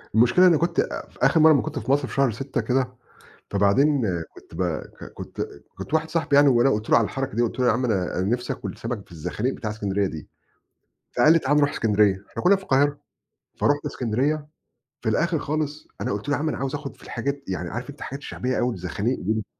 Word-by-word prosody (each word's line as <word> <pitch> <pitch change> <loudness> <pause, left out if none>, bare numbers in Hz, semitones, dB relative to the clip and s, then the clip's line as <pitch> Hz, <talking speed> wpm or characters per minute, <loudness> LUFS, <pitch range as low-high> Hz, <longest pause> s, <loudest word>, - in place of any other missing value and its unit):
المشكلة 120 +11 +6
إني 170 -4 +5
كنت 170 +1 +1 0.3
في - - -21
آخر 160 - +4
مرة 160 +1 +8
اما 140 -4 +4
كنت - - -4
في 130 - -2
مصر 140 -2 +2
في - - -9
شهر 135 -3 +3
6 130 +1 -3
كده، 125 +3 0 0.6
فبعدين 125 +8 +3 0.3
كنت - - -15
ب 90 - -1 0.2
ك - - -12
كت، - - -6 0.2
كنت - - -5
واحد 160 0 +1
صاحبي 145 -4 +1
يعني 145 0 +7
وأنا 125 +1 +4
قُلت 110 -1 -2
له - - +7
على 115 - +4
الحركة 135 0 -3
دي، 120 - +3
قُلت 120 +1 -2
له 125 - +3
يا - - +5
عم 125 - -1
أنا 95 -5 0
نفْسي 120 +6 -1
آكل - - -6
سمك 115 -4 -5
في - - -18
الزخانيق 105 - -2
بتاعة 110 -3 -4
اسكندرية 100 -2 -1
دي، 80 -5 -7 0.9
فقال 150 +6 +6
لي 165 - +5
تعال 145 0 +1
نروح 145 -1 +4
اسكندرية 105 -3 +2
إحنا - - -5
كنا 195 +2 +6
في 195 - -11
القاهرة. 145 -2 +2 0.6
فرُحت 145 0 +1
اسكندرية. 135 +6 -1 0.6
في 110 - 0
الآخر 160 - +1
خالص 150 0 -3
أنا - - -1
قُلت 105 +7 -4
له 145 - +3
يا - - -3
عم 155 +1 0
أنا - - -3
عاوز 135 +1 -2
آخد 140 -1 -6
في - - -19
الحاجات 140 +4 -3
يعني 90 -2 -3
عارف 120 +7 -5
أنت 145 - -10
الحاجات 135 - -6
الشعبية 130 -2 -3
أوي 120 -1 +1
الزخانيق 100 +7 -2
دي 110 +2 -1
130 Hz, 225 wpm, -24 LUFS, 110-145 Hz, 0.9 s, مرة